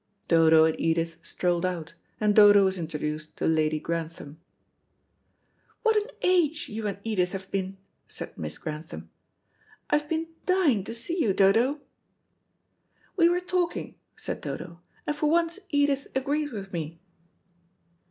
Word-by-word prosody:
Dodo 160 -1 +6
and 160 0 +1
Edith 165 0 0
strolled 175 -1 -1
out, 175 -3 -3 0.3
and 210 -1 +2
Dodo 205 -1 +8
was 190 -1 0
introduced 155 -1 -4
to - - -2
Lady 155 -1 +2
Grantham. 165 -2 -5 1.4
"What 445 -1 +4
an 425 0 +1 0.2
age 330 -5 +2
you 215 0 -3
and 200 - -3
Edith 190 -5 0
have 190 0 -6
been," 195 0 -2 0.3
said - - -8
Miss - - -5
Grantham. 155 +1 -7 0.8
"I - - +6
have 300 0 -15
been 325 0 -1 0.2
dying 335 - +3
to 230 - -5
see 335 +9 -2
you, 205 -8 +2
Dodo." 230 +10 +3 1.3
"We 340 -2 +5
were 350 +1 +2
talking," 360 -1 -1 0.2
said - - -5
Dodo, 170 0 -6 0.2
"and 295 - -1
for 300 0 +1
once 340 +3 +1
Edith 285 -2 +1
agreed 290 +3 0
with 195 -3 -7
me." 165 -1 -4
200 Hz, 140 wpm, -27 LUFS, -, 1.4 s, Dodo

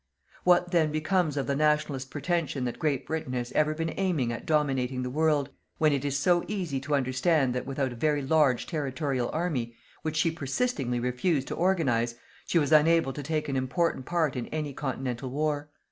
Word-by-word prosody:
What 180 0 +4
then 160 -4 +3
becomes 155 0 0
of 140 - 0
the 140 - 0
"Nationalist" 150 -3 +1
pretention 155 -2 -1
that 120 - -4
Great 140 -5 0
Britain 160 -5 -3
has 120 -1 -3
ever 155 0 +2
been 165 0 -2
aiming 170 -11 0
at 115 - -7
dominating 135 -4 +1
the 125 - -3
world, 150 -1 +1 0.3
when 155 -2 +3
it 140 -1 -1
is 140 -1 0
so 175 +5 +3
easy 180 -10 -2
to 145 +2 -1
understand 135 +1 +2
that 125 0 -3
without 135 -1 -1
a - - -10
very 150 +2 +1
large 140 -3 +3
territorial 135 -4 -2
army, 140 -9 -2 0.3
which 155 -1 -3
she 165 +1 +2
persistingly 140 - -1
refused 125 +5 0
to - - -3
organize, 130 -11 +1 0.3
she - - +2
was 150 -2 +2
unable 155 -2 +4
to 145 - -5
take 150 +1 -2
an 135 - -2
important 130 +2 0
part 165 -5 +1
in 125 -2 -3
any 150 -2 -3
continental 130 -2 -3
war. 150 +2 -1
145 Hz, 190 wpm, -28 LUFS, 130-160 Hz, 0.3 s, What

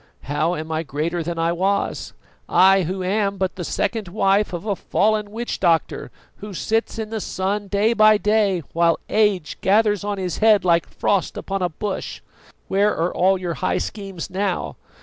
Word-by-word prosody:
How 155 +5 0
am 160 0 -6
I 160 0 0
greater 165 +3 -3
than 170 +1 -4
I 165 0 +1
was 195 +3 -1 0.4
I 195 +1 +5
who 190 0 -3
am 200 +1 0
but 190 -1 -1
the 180 - -5
second 205 +4 -2
wife 195 +2 +1
of 175 +2 -5
a 205 -2 0
fallen 210 +3 0
witch 230 +3 -4
doctor, 170 -3 +1 0.3
who 205 -1 -8
sits 225 +5 -1
in 220 -1 -5
the 220 -1 -3
sun, 200 +2 -2
day 205 +3 +2
by 215 -1 +6
day, 205 -4 +1
while 170 0 +3
age 205 -7 +1
gathers 205 0 +2
on 205 0 -2
his 185 -2 -3
head 215 -3 +4
like 170 -1 +3
frost 200 -3 -1
upon 195 0 -3
a 180 - +1
bush? 195 +5 -5 0.5
Where 200 +2 +2
are 170 +2 0
all 190 +1 +3
your 180 -2 -3
high 185 +3 -1
schemes 195 -5 -5
now? 190 -1 -2
195 Hz, 180 wpm, -21 LUFS, 175-210 Hz, 0.5 s, by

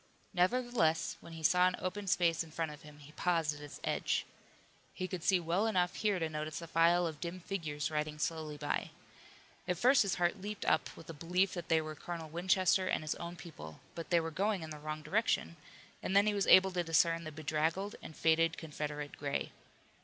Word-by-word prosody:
Nevertheless 185 -4 +2
when 170 - -11
he 160 -1 -8
saw 180 +3 +5
an 185 - 0
open 195 +2 -4
space 170 -2 +2
in 165 - -13
front 160 0 -3
of 150 - -11
him 150 -1 -13
he 145 0 -14
paused 165 -1 +1
at 145 - -10
its 145 -1 -9
edge. - - 0 0.7
He 185 - -3
could 185 -2 -5
see 190 0 +4
well 175 +6 +1
enough 180 -5 +1
here 210 -3 +1
to 165 -2 0
notice 155 0 -4
a 170 - -7
file 170 +2 +4
of 160 -3 -5
dim 175 +1 -4
figures 160 -5 -3
riding 150 0 -2
slowly 155 -1 -2
by. 145 0 -2 0.8
At 180 - 0
first 255 - +5
his 200 -3 +1
heart 175 +2 0
leaped 210 +1 -5
up - - +2
with 165 - -11
the 165 - -7
belief 180 +5 +1
that 175 -2 -6
they 160 -1 +4
were 155 0 -5
Colonel 165 +1 -6
Winchester 185 +2 +2
and - - 0
his 155 - -1
own 170 +1 -7
people, 115 - -10
but 165 - -7
they 175 -2 +4
were 165 0 -3
going 195 +1 0
in 160 - -7
the 150 - -7
wrong 155 +1 -5
direction, 190 0 0 0.5
and 195 - +1
then 200 - +6
he 210 - +2
was 200 -1 0
able 190 0 +7
to 180 -1 0
discern 165 0 +3
the 155 - -6
bedraggled 160 +6 -1
and 155 - -10
faded 165 +1 +3
Confederate 150 -2 -5
gray. 140 -1 -2
165 Hz, 215 wpm, -34 LUFS, 155-185 Hz, 0.8 s, able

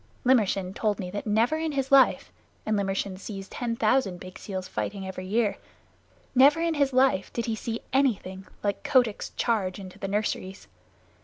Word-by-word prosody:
Limmershin 200 -7 +2
told 210 0 -1
me 180 -2 -5
that 205 +2 -5
never 230 +9 +2
in 320 -1 -2
his 270 -1 -2
life 275 -1 +5 0.3
and 215 - +1
Limmershin 195 -1 -2
sees 195 -1 -7
ten 235 +2 -3
thousand 215 -5 +1
big 185 0 -10
seals 190 -2 -5
fighting 195 -1 -4
every 185 0 -6
year 210 0 +1 0.8
never 275 +5 +6
in 335 0 +1
all 300 - -4
his 280 -1 +3
little 260 +1 +6
life 190 -7 -3
did 235 - -2
he 230 - -1
see 230 +1 -4
anything 195 -8 0 0.2
like 200 -1 -1
Kotick's 245 -6 +2
charge 205 -6 0
into 190 -1 -10
the 195 - -3
nurseries. 195 -1 -3
210 Hz, 180 wpm, -27 LUFS, 195-255 Hz, 0.8 s, never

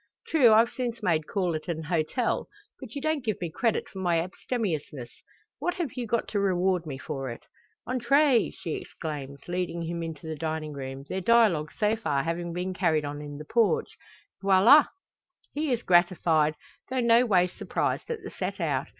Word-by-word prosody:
True, 265 -8 +5
I've 225 +2 +5
since 235 -3 -4
made 160 -4 +1
call 185 -4 0
at 155 -1 -5
an 160 -2 -3
hotel, 165 - -1 0.3
but 255 -3 -10
you 280 - -3
don't 310 -3 0
give 215 -4 -2
me 170 -4 -4
credit 230 +6 0
for 190 - -9
my 175 -3 +2
abstemiousness! 165 - -3 0.5
What 355 - -1
have 340 -9 -3
you 245 -2 -4
got 235 +1 0
to 205 - -1
reward 185 -3 +1
me 135 -3 -5
for 135 -2 -5
it?" 120 - -9 0.4
"Entrez!" 255 0 +3
she 175 -5 -4
exclaims, 140 -3 -7
leading 175 -1 -2
him 170 +1 -3
into 165 -2 -6
the 160 0 -4
dining 155 -1 -3
room, 135 0 -7
their 190 - -3
dialogue 195 -8 +3
so 215 0 +2
far 145 -12 -1
having 170 +1 -3
been 180 +2 -3
carried 155 -4 +1
on 145 0 -5
in 145 -1 -7
the 150 - -8
porch. 240 - +1 0.5
"Voila!" 200 +10 +7 0.7
He 295 0 -1
is 240 -1 0
gratified, 170 -4 +3 0.3
though 260 0 -1
no 235 +1 +4
ways 180 -4 +3
surprised - - -2
at 465 -3 -4
the - - -7
set - - -4
out. - - -1
180 Hz, 185 wpm, -27 LUFS, 155-235 Hz, 0.7 s, Voila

